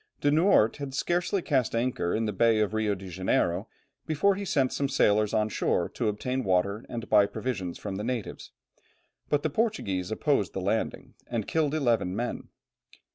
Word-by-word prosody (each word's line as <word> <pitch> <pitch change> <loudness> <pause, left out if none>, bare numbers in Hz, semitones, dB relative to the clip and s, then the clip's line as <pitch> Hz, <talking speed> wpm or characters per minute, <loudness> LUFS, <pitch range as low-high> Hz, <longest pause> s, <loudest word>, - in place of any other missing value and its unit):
De 145 - +2
Noort 155 - +4
had 140 -2 -6
scarcely 175 +5 0
cast 130 -6 +1
anchor 115 -7 0
in 110 +1 0
the 105 - -2
Bay 115 +2 +3
of 105 0 0
Rio 110 -2 +1
Janeiro 95 +1 -1 0.4
before 160 +6 +3
he 200 +1 -4
sent 135 -7 +1
some 140 -1 -1
sailors 105 -5 +3
on 110 -1 +1
shore 110 - 0
to - - -2
obtain 125 +5 -2
water 100 +3 +1
and 115 -1 -5
buy 105 -2 +5
provisions 95 -8 -4
from 100 -2 -5
the 105 - -4
natives; 120 -2 -4 0.8
but 145 -1 +1
the 155 - +1
Portuguese 120 - -1
opposed 110 - 0
the - - -3
landing, 100 +4 -2
and 115 -4 -3
killed 155 -2 +1
eleven 115 -10 +1
men. 120 +3 -4
115 Hz, 175 wpm, -28 LUFS, 100-140 Hz, 0.8 s, buy